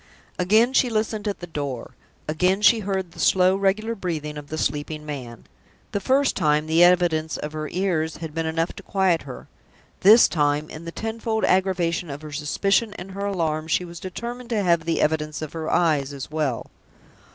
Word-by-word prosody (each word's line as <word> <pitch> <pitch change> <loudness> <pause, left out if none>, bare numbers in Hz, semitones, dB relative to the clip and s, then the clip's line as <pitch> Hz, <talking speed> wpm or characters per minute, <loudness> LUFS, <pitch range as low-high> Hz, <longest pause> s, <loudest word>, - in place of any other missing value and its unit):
Again 215 +8 +4
she 255 - +3
listened 215 -1 -1
at 200 - -3
the - - -5
door; 140 -7 -5 0.4
again 180 +6 +1
she 230 +2 +6
heard 190 -3 -3
the - - -14
slow, 185 0 +4
regular 200 +4 0
breathing 160 -7 -4
of 145 -1 -8
the 155 - -5
sleeping 150 +1 -2
man. 125 -6 -7 0.5
The 200 - -1
first 265 +7 +2
time 150 0 +2
the 160 +2 +4
evidence 175 -3 +3
of 150 +1 -6
her 155 0 -4
ears 170 -4 -1
had 160 -1 -7
been 165 0 -2
enough 165 +1 -1
to - - -7
quiet 190 -4 +1
her; 125 - -9 0.5
this 215 +5 +7
time, 150 -1 0
in 160 +2 -9
the 170 - -5
tenfold 225 +2 -2
aggravation 180 -3 +1
of 145 +2 -7
her 155 - -8
suspicion 195 +9 0
and 190 -1 -8
her 200 +1 -3
alarm, 160 -5 -1
she 180 +3 +1
was 170 -1 -9
determined 235 +7 -6
to 215 -4 0
have 170 -3 +2
the 165 - 0
evidence 155 0 0
of 155 - -7
her 160 -1 -4
eyes 150 -5 +1
as 140 +1 -7
well. 150 -6 -2
170 Hz, 190 wpm, -23 LUFS, 155-195 Hz, 0.5 s, this